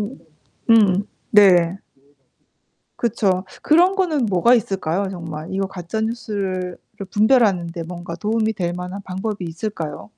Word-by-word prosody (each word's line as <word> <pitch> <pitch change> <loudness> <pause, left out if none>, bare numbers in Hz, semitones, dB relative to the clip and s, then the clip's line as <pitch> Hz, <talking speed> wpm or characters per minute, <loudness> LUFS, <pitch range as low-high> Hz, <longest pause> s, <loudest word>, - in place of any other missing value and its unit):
음 210 +6 -5 0.5
음. 205 -4 +5 0.3
네. 185 -4 +5 1.2
그쵸. 200 -5 0 0.2
그런 350 +5 +4
거는 325 -9 +1
뭐가 200 +6 +4
있을까요, 195 -3 -1
정말? 165 -3 -7
이거 195 0 -1
가짜 190 +3 -5
뉴스를 200 -5 -3 0.2
를 195 - -6
분별하는데 200 -7 +2
뭔가 170 0 -7
도움이 220 +3 0
될 175 -2 -2
만한 180 +3 -6
방법이 190 +1 -4
있을까요? 165 - -5
195 Hz, 265 characters per minute, -21 LUFS, 175-220 Hz, 1.2 s, 음